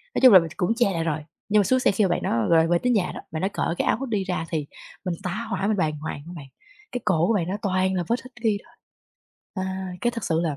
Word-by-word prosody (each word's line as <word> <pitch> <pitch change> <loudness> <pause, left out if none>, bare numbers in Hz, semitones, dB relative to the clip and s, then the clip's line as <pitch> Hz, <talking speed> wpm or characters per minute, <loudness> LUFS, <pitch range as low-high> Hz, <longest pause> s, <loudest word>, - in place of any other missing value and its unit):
nói - - +1
chung 255 -5 +9
là 185 - +11
mình 165 -1 -4
cũng 195 +5 +1
che 235 -5 +2
lại 165 -1 -1
rồi, 155 -2 -1 0.3
nhưng 210 0 +5
mà - - +5
xuống 255 +7 +2
xe - - +3
khi 205 +2 +1
mà - - +1
bạn 175 - 0
đó 115 -1 +1
rồi 165 -1 +5
về 175 0 +3
tới 250 - +1
nhà 205 -6 +1
đó, - - -6
bạn 160 - -3
đó 190 - +2
cởi 170 - -1
cái - - 0
áo - - +3
hoodie 230 -7 -2
ra 180 -3 -2
thì 150 -3 -2 0.4
mình 175 -2 -1
tá 215 +6 -3
hỏa, 195 0 -1
mình 215 -2 +1
bàng 155 -3 0
hoàng 150 -2 -5
á 175 - -8
bạn! 140 -4 -9 0.4
Cái 245 - -3
cổ 170 -1 +3
của 230 - +3
bạn 175 -5 0
đó 195 - -2
toàn 190 -1 +1
là 175 - 0
vết 235 - +1
hickey 240 -5 -1
thôi. - - -22 0.9
À, 190 0 -4
cái 240 - +2
thật 230 -3 -6
sự 165 0 +1
là 155 -4 -1
185 Hz, 295 wpm, -24 LUFS, 165-215 Hz, 0.9 s, là